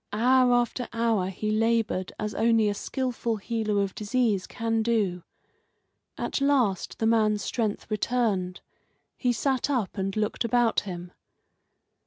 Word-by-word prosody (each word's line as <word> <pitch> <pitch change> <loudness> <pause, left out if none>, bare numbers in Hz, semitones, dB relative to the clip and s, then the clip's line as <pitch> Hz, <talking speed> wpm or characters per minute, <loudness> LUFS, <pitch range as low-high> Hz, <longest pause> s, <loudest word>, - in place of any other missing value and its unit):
Hour 250 +3 +4
after 245 +1 0
hour 230 -5 +1
he 215 +3 -3
laboured 225 -4 +1
as 210 0 -3
only 225 -1 +3
a 205 - +1
skilful 240 +1 -2
healer 210 -1 -1
of 195 - -4
disease 215 -3 0
can 225 -1 -1
do. 210 -6 0 1.0
At - - -2
last 255 -10 +1
the 220 - -1
man's 215 -2 +2
strength 220 -4 -2
returned; 210 -5 0 0.5
he 250 - +1
sat 265 +3 0
up 230 -7 -1
and 195 0 -2
looked 215 +2 -1
about 235 0 +2
him. 180 -2 -7
225 Hz, 135 wpm, -27 LUFS, 205-240 Hz, 1.0 s, Hour